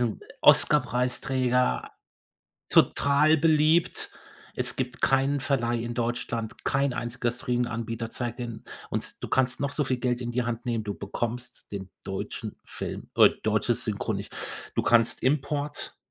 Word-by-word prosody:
'n 110 Hz, -, -5 dB, 0.2 s
Oscarpreisträger, 125 Hz, -1 st, +3 dB, 0.8 s
total 150 Hz, +3 st, +4 dB
beliebt. 160 Hz, +2 st, +3 dB, 0.4 s
Es -, -, -1 dB
gibt 125 Hz, -1 st, -4 dB
keinen 135 Hz, +1 st, +3 dB
Verleih 120 Hz, -4 st, 0 dB
in 120 Hz, 0 st, -4 dB
Deutschland, 120 Hz, -1 st, -3 dB
kein 135 Hz, -1 st, +2 dB
einziger 120 Hz, 0 st, -2 dB
Streaminganbieter 115 Hz, -2 st, -2 dB
zeigt 120 Hz, 0 st, -4 dB
den 115 Hz, -2 st, -5 dB, 0.3 s
und -, -, -4 dB
du -, -, -2 dB
kannst 130 Hz, -1 st, +2 dB
noch 140 Hz, 0 st, -1 dB
so 150 Hz, -, 0 dB
viel 130 Hz, -2 st, 0 dB
Geld 125 Hz, 0 st, -1 dB
in 120 Hz, -1 st, -3 dB
die 125 Hz, +1 st, 0 dB
Hand 120 Hz, 0 st, -3 dB
nehmen, 115 Hz, -3 st, -1 dB
du 105 Hz, -1 st, -3 dB
bekommst 120 Hz, +5 st, -5 dB
den 95 Hz, -2 st, -6 dB
deutschen 95 Hz, 0 st, -5 dB
Film, -, -, -6 dB
äh -, -, +9 dB
deutsches -, -, +1 dB
Synchro -, -, -1 dB
nicht. -, -, -5 dB, 0.4 s
Du -, -, +2 dB
kannst 115 Hz, -1 st, +3 dB
Import 145 Hz, +1 st, -1 dB
125 Hz, 140 wpm, -27 LUFS, 120-135 Hz, 0.8 s, äh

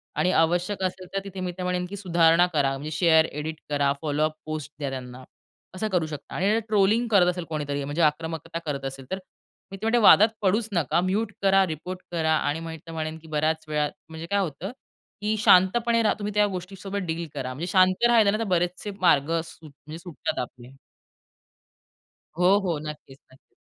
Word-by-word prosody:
आणि 185 Hz, -, +2 dB
आवश्यक 175 Hz, +4 st, +1 dB
असेल 185 Hz, 0 st, -3 dB
तर 195 Hz, -, 0 dB
तिथे 195 Hz, -1 st, -8 dB
मी 180 Hz, -1 st, -2 dB
तर 185 Hz, -, -4 dB
म्हणेन 180 Hz, 0 st, -1 dB
की 200 Hz, -, -6 dB
सुधारणा 170 Hz, -2 st, +4 dB
करा. 140 Hz, -2 st, +2 dB
म्हणजे 150 Hz, +3 st, -6 dB
शेअर, 160 Hz, 0 st, +4 dB
एडिट 155 Hz, +2 st, -5 dB
करा, 145 Hz, -1 st, +2 dB
फॉलोअप 155 Hz, 0 st, 0 dB
पोस्ट 155 Hz, -2 st, -5 dB
द्या 140 Hz, -2 st, -2 dB
त्यांना, 130 Hz, -1 st, -7 dB, 0.5 s
असं 215 Hz, +4 st, -2 dB
करू 180 Hz, -4 st, +1 dB
शकता. 150 Hz, -3 st, -8 dB
आणि 190 Hz, +3 st, +1 dB
अ, -, -, +2 dB
ट्रोलिंग 215 Hz, +3 st, +3 dB
करत 190 Hz, -4 st, +5 dB
असेल 180 Hz, 0 st, -5 dB
कोणीतरी, 145 Hz, -2 st, -3 dB
म्हणजे 145 Hz, +4 st, -2 dB
आक्रमकता 160 Hz, +2 st, -1 dB
करत 140 Hz, -3 st, -3 dB
असेल, 135 Hz, 0 st, -6 dB
तर 190 Hz, -, -2 dB, 0.5 s
मी 195 Hz, -, -7 dB
तर 200 Hz, -, -15 dB
म्हणेन 235 Hz, +2 st, +3 dB
की -, -, 0 dB
वादात 215 Hz, +3 st, +8 dB
पडूच 210 Hz, +3 st, +1 dB
नका. 170 Hz, -1 st, +1 dB
म्यूट 200 Hz, +4 st, -1 dB
करा, 195 Hz, 0 st, +4 dB
रिपोर्ट 175 Hz, +3 st, -6 dB
करा 160 Hz, -2 st, +1 dB
आणि 160 Hz, +2 st, -2 dB
तर 165 Hz, -, -7 dB
म्हणेन 155 Hz, 0 st, -4 dB
की 160 Hz, -, -15 dB
बऱ्याच 155 Hz, +1 st, 0 dB
वेळा 150 Hz, -1 st, 0 dB, 0.2 s
म्हणजे 160 Hz, 0 st, -7 dB
काय 200 Hz, -, +3 dB
होतं, 180 Hz, +1 st, -3 dB, 0.5 s
की 215 Hz, +1 st, 0 dB
शांतपणे 225 Hz, +5 st, +4 dB
रहा. 215 Hz, -, +3 dB
तुम्ही 210 Hz, 0 st, -3 dB
त्या 210 Hz, 0 st, +4 dB
गोष्टीसोबत 195 Hz, +2 st, -6 dB
डील 165 Hz, 0 st, -3 dB
करा. 130 Hz, -1 st, -4 dB
म्हणजे 160 Hz, +7 st, -5 dB
शांत 185 Hz, +4 st, +4 dB
राहायला 225 Hz, -4 st, +5 dB
ना, 215 Hz, -, 0 dB
तर -, -, 0 dB
बरेचसे 180 Hz, +4 st, -2 dB
मार्ग 150 Hz, -5 st, +4 dB
म्हणजे 165 Hz, -1 st, +1 dB, 0.6 s
सुट -, -, -12 dB
सुटतात 165 Hz, -, -3 dB
आपले. 125 Hz, 0 st, -12 dB, 1.7 s
हो, 185 Hz, +3 st, +5 dB
हो, 170 Hz, -4 st, -1 dB
नक्कीच, 140 Hz, -3 st, -10 dB
नक्कीच. 130 Hz, -, -24 dB
170 Hz, 195 wpm, -25 LUFS, 155-195 Hz, 1.7 s, वादात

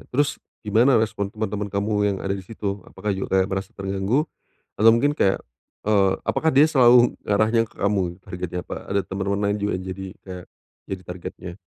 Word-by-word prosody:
Terus, 145 Hz, +3 st, 0 dB, 0.2 s
gimana 115 Hz, +4 st, +4 dB
respon 105 Hz, -2 st, -1 dB
temen-temen 105 Hz, -1 st, -3 dB
kamu 100 Hz, +2 st, -1 dB, 0.2 s
yang 95 Hz, -, -2 dB
ada 95 Hz, -, 0 dB
di 95 Hz, -, -6 dB
situ? 100 Hz, -1 st, -5 dB
Apakah 105 Hz, -1 st, -3 dB
juga 95 Hz, 0 st, 0 dB
kayak 95 Hz, -, +3 dB
merasa 95 Hz, 0 st, -3 dB
terganggu? 100 Hz, +9 st, 0 dB, 0.5 s
Atau 110 Hz, +2 st, +6 dB
mungkin 145 Hz, +5 st, +2 dB
kayak 95 Hz, -8 st, +2 dB, 0.5 s
eee, 100 Hz, -3 st, +4 dB
apakah 160 Hz, -, +2 dB
dia 145 Hz, +2 st, +6 dB
selalu 125 Hz, -4 st, +5 dB
ngarahnya 110 Hz, +3 st, +2 dB
ke -, -, -25 dB
kamu, 95 Hz, -3 st, 0 dB
targetnya? 90 Hz, 0 st, -5 dB
Apa -, -, -5 dB
ada 100 Hz, 0 st, +2 dB
temen-temen 100 Hz, +1 st, -2 dB
lain 100 Hz, +1 st, +1 dB
juga 105 Hz, -, 0 dB
yang 95 Hz, -, -8 dB
jadi 95 Hz, +1 st, -7 dB, 0.2 s
kayak, 90 Hz, -2 st, -8 dB, 0.5 s
jadi 95 Hz, -1 st, -4 dB
targetnya? 90 Hz, 0 st, -7 dB
100 Hz, 180 wpm, -23 LUFS, 95-110 Hz, 0.5 s, Atau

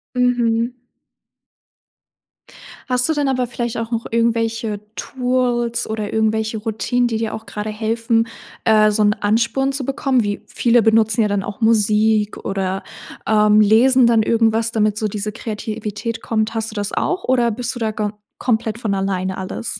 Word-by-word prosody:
Mhm. 245 Hz, -1 st, +1 dB, 2.1 s
Hast 250 Hz, 0 st, +2 dB
du 320 Hz, -, +1 dB
denn 290 Hz, -2 st, 0 dB
aber 255 Hz, -2 st, +1 dB
vielleicht 240 Hz, -1 st, -4 dB
auch 230 Hz, 0 st, -4 dB
noch 230 Hz, -1 st, -2 dB
irgendwelche 225 Hz, -2 st, 0 dB
Tools 245 Hz, -2 st, -1 dB
oder 215 Hz, -1 st, -3 dB
irgendwelche 220 Hz, 0 st, 0 dB
Routinen, 230 Hz, +3 st, 0 dB
die 225 Hz, -2 st, -2 dB
dir 225 Hz, -1 st, -2 dB
auch 220 Hz, -, -9 dB
grade 210 Hz, 0 st, -5 dB
helfen, 225 Hz, +1 st, 0 dB, 0.4 s
äh, 215 Hz, -1 st, +5 dB
so 210 Hz, 0 st, +1 dB
'n 205 Hz, 0 st, +4 dB
Ansporn 230 Hz, +6 st, 0 dB
zu 270 Hz, -1 st, -3 dB
bekommen? 265 Hz, -2 st, +1 dB
Wie 205 Hz, 0 st, -3 dB
viele 240 Hz, 0 st, +3 dB
benutzen 220 Hz, 0 st, +3 dB
ja 215 Hz, -, +3 dB
dann 200 Hz, -1 st, -1 dB
auch 205 Hz, +2 st, -7 dB
Musik 215 Hz, -1 st, +2 dB
oder, 195 Hz, -1 st, -2 dB, 0.5 s
ähm, 210 Hz, 0 st, +5 dB
lesen 240 Hz, +4 st, +5 dB
dann 230 Hz, -2 st, +4 dB
irgendwas, 225 Hz, 0 st, +2 dB
damit 215 Hz, -2 st, +1 dB
so 215 Hz, -, 0 dB
diese 210 Hz, 0 st, -4 dB
Kreativität 215 Hz, +1 st, -5 dB
kommt. 220 Hz, 0 st, -1 dB
Hast 225 Hz, 0 st, -2 dB
du -, -, -12 dB
das 205 Hz, -1 st, -2 dB
auch 365 Hz, +1 st, -1 dB
oder 245 Hz, -2 st, +2 dB
bist 240 Hz, +3 st, -3 dB
du -, -, -6 dB
da 220 Hz, -2 st, -1 dB
ga 210 Hz, -1 st, -2 dB, 0.3 s
komplett 225 Hz, -2 st, -1 dB
von 215 Hz, -4 st, -1 dB
alleine 190 Hz, -1 st, -2 dB
alles? 195 Hz, +2 st, -5 dB
225 Hz, 165 wpm, -19 LUFS, 210-235 Hz, 2.1 s, äh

